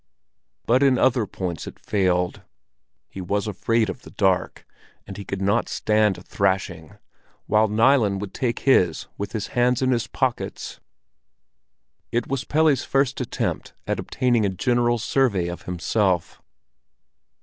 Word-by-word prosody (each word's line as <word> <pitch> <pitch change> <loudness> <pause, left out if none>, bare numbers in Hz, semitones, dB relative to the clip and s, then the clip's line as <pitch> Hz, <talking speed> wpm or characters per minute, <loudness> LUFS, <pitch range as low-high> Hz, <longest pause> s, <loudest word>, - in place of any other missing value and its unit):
But 125 +3 +3
in 135 -2 +4
other 120 -4 +2
points 90 -5 -5
it - - -9
failed. 90 -3 0 0.7
He 95 - -8
was 100 +3 -1
afraid 110 +2 0
of 100 +6 -6
the - - -13
dark, 95 -3 0 0.4
and 100 - -9
he 100 - -7
could 100 0 -4
not 100 +1 +1
stand 105 -2 +1
a - - -12
thrashing, 95 -4 -2 0.5
while 110 0 +3
Nilen 110 -2 +3
could 100 -1 -6
take 120 -3 -2
his 90 - +3
with 100 0 -4
his 110 -3 -3
hands 125 +1 +2
in 130 - +2
his 120 -2 0
pockets. 130 -3 -3 1.3
It 120 0 0
was 135 0 -3
Pelle's 150 -3 +2
first 135 -1 0
attempt 125 - -3
at - - -2
obtaining 120 -3 +1
a 100 - +2
general 120 +5 +1
survey 110 -6 +1
of 85 - -6
himself. 90 0 -1
110 Hz, 145 wpm, -23 LUFS, 95-125 Hz, 1.3 s, in